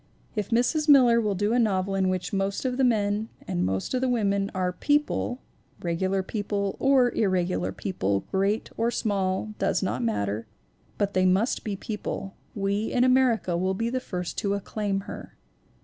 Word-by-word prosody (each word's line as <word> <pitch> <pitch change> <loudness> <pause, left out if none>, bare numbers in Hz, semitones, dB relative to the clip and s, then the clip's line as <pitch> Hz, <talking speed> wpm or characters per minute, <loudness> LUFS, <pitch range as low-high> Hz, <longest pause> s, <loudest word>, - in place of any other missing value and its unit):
If 210 -3 -2
Mrs. 250 +7 +1
Miller 245 -5 +7
will 210 -3 0
do 205 +4 +1
a 245 - +3
novel 195 -4 +1
in 190 -1 +1
which 185 0 -2
most 195 +4 -1
of 250 -1 -1
the 270 - +2
men 215 -2 +1 0.2
and 90 - -1
most 95 - -1
of 255 - 0
the 260 - +1
women 200 -4 +1
are 180 -1 0
"peo 290 - +3
ple" 270 -3 -3 0.4
regular 185 +3 -1
people 200 -1 -2
or 265 -3 +4
irregular 185 -4 0
people, 100 - -1
great 200 +3 0
or 230 - +1
ALICE 240 - -1
DUER - - -1
MILLER 205 -1 +1 0.4
325 - - 0
small, 190 - 0
does - - -3
not - - -2
matter; 105 -1 -1 0.5
but 200 0 0
they 185 0 +3
must 195 +7 +1
be 210 -2 -3
people 195 -1 -5 0.2
we 200 +1 0
in 245 - +3
America 255 -8 +3
will 185 +2 0
be 230 +4 -1
the 255 - 0
first 180 -8 -4
to 200 -1 0
acclaim 200 0 -2
her. - - -9
200 Hz, 195 wpm, -26 LUFS, 185-235 Hz, 0.5 s, Miller